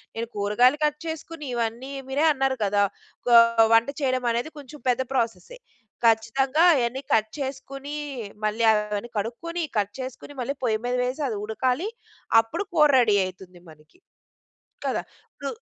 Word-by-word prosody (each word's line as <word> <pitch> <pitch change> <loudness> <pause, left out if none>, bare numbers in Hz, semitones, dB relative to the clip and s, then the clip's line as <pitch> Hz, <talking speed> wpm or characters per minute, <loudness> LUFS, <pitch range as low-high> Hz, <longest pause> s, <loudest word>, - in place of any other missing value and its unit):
నేను 230 +1 -3
కూరగాయలు 210 +7 +3
కట్ 300 0 -1
చేసుకొని 320 -1 -6
ఇవన్నీ 235 +3 -3 0.2
మీరే 285 +4 +1
అన్నారు 270 -1 0
కదా! 205 0 +2 0.4
కా 240 - +6 0.4
వంట 230 +2 +5
చేయడమనేది 255 0 0
కొంచెం 290 +1 -12
పెద్ద 250 +1 +2
ప్రాసెసె. 255 - -2 0.5
ఖచ్చితంగా 245 +6 +2
అయన్నీ 250 0 -1
కట్ 220 0 +2
చేసుకొని 275 +1 -5 0.5
మళ్ళీ 215 +2 0
అవన్నీ 210 +1 -1
కడుక్కొని, 325 +12 -3
కట్ 205 -1 0
చేసుకొని 260 +2 -7
మళ్ళీ 255 +3 -2
పొయ్యి 220 -3 +1
మీద 245 0 0
వేసి 255 +4 -3
అది 215 - -3
ఉడకాలి 255 - -1 0.5
అప్పుడు 225 - -4
కూర 300 -3 +5
రెడీ 220 -4 +4
అయితుంది 185 -1 -10
మనికి 155 - -19 0.9
కదా! - - -1 0.3
ఇప్పుడు 280 - -5
245 Hz, 140 wpm, -25 LUFS, 220-275 Hz, 0.9 s, కా